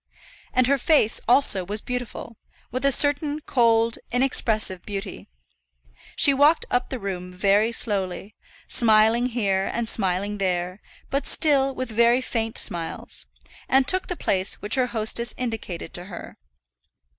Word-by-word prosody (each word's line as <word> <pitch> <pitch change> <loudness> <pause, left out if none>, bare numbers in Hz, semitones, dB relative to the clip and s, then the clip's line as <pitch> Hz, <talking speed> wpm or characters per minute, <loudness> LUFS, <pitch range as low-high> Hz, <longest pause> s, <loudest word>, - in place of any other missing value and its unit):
And 255 - +2
her 275 +2 +1
face, 265 -5 +2
also, 240 -6 +4
was 205 +4 -4
beautiful, 245 -1 -6 0.3
with 255 +3 -4
a 275 - +4
certain 290 +2 +2
cold, 230 -5 +1
inexpressive 220 -7 +1
beauty. 200 -2 -7 0.9
She 280 - +5
walked 290 +4 +3
up 245 - 0
the 260 - -4
room 185 -4 -6
very 200 +4 +2
slowly, 200 -3 -2 0.3
smiling 225 +1 +3
here 200 -6 -1
and 235 -1 -3
smiling 200 0 -1
there; 180 0 -2 0.3
but 275 +1 -1
still 275 -3 +2
with 255 -2 -5
very 235 +2 +3
faint 225 -3 -3
smiles, 165 - -3 0.4
and 265 0 +3
took 370 0 0
the 360 - -4
place 190 - 0
which 205 +2 -3
her 255 -1 +3
hostess 235 +1 -1
indicated 220 -9 -5
to 175 - -3
her. 180 -3 -10
225 Hz, 140 wpm, -23 LUFS, 195-255 Hz, 0.9 s, She